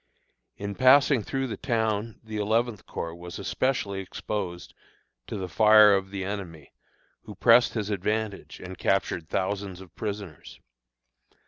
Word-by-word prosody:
In 100 Hz, +1 st, -4 dB
passing 135 Hz, +1 st, +5 dB
through 135 Hz, +6 st, -2 dB
the 115 Hz, -, -5 dB
town 110 Hz, -1 st, -1 dB
the 110 Hz, -1 st, -6 dB
Eleventh 110 Hz, 0 st, 0 dB
Corps 85 Hz, 0 st, -5 dB
was 85 Hz, +1 st, -9 dB
especially 100 Hz, -2 st, -1 dB
exposed 95 Hz, -2 st, -5 dB, 0.5 s
to -, -, -5 dB
the 95 Hz, -1 st, -4 dB
fire 105 Hz, +3 st, +7 dB
of 95 Hz, -1 st, 0 dB
the 95 Hz, -1 st, -4 dB
enemy, 90 Hz, -7 st, -6 dB, 0.5 s
who -, -, -9 dB
pressed 120 Hz, 0 st, +5 dB
his 105 Hz, -2 st, -2 dB
advantage 105 Hz, +1 st, -3 dB
and 90 Hz, 0 st, -9 dB
captured 85 Hz, -4 st, 0 dB
thousands 95 Hz, -1 st, -2 dB
of 95 Hz, -3 st, -13 dB
prisoners. 100 Hz, -7 st, -7 dB
100 Hz, 135 wpm, -27 LUFS, 95-110 Hz, 0.5 s, fire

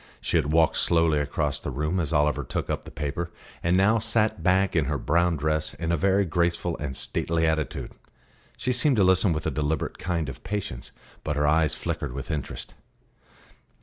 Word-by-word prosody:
She -, -, -2 dB
had 75 Hz, -, +2 dB
walked 80 Hz, 0 st, +3 dB
slowly 80 Hz, -3 st, +3 dB
across 75 Hz, 0 st, -1 dB
the -, -, -5 dB
room 75 Hz, +7 st, -1 dB
as 80 Hz, -3 st, -1 dB
Oliver 75 Hz, -2 st, +2 dB
took -, -, -3 dB
up -, -, -3 dB
the -, -, -8 dB
paper, 80 Hz, +4 st, -3 dB, 0.3 s
and 85 Hz, +2 st, +2 dB
now 105 Hz, +4 st, +4 dB
sat 110 Hz, -4 st, +1 dB
back 95 Hz, +2 st, +2 dB
in 80 Hz, -4 st, +3 dB
her 75 Hz, +1 st, -1 dB
brown 85 Hz, +4 st, +2 dB
dress 75 Hz, +1 st, -1 dB
in 85 Hz, 0 st, -2 dB
a -, -, +3 dB
very 100 Hz, +4 st, +2 dB
graceful 85 Hz, 0 st, 0 dB
and 65 Hz, -4 st, -4 dB
stately 80 Hz, 0 st, -1 dB
attitude. 80 Hz, -4 st, -1 dB, 0.7 s
She 125 Hz, -, 0 dB
seemed 125 Hz, +1 st, +2 dB
to 100 Hz, -, +5 dB
listen 95 Hz, +1 st, +4 dB
with 80 Hz, -1 st, -2 dB
a -, -, 0 dB
deliberate 75 Hz, 0 st, -2 dB
kind 85 Hz, -4 st, -1 dB
of 70 Hz, -, -8 dB
patience; 95 Hz, -12 st, -4 dB, 0.3 s
but 75 Hz, -, -2 dB
her 75 Hz, 0 st, +1 dB
eyes 80 Hz, +1 st, +3 dB
flickered -, -, -3 dB
with 70 Hz, +4 st, -5 dB
interest. 75 Hz, -3 st, -5 dB
80 Hz, 190 wpm, -26 LUFS, 75-90 Hz, 0.7 s, to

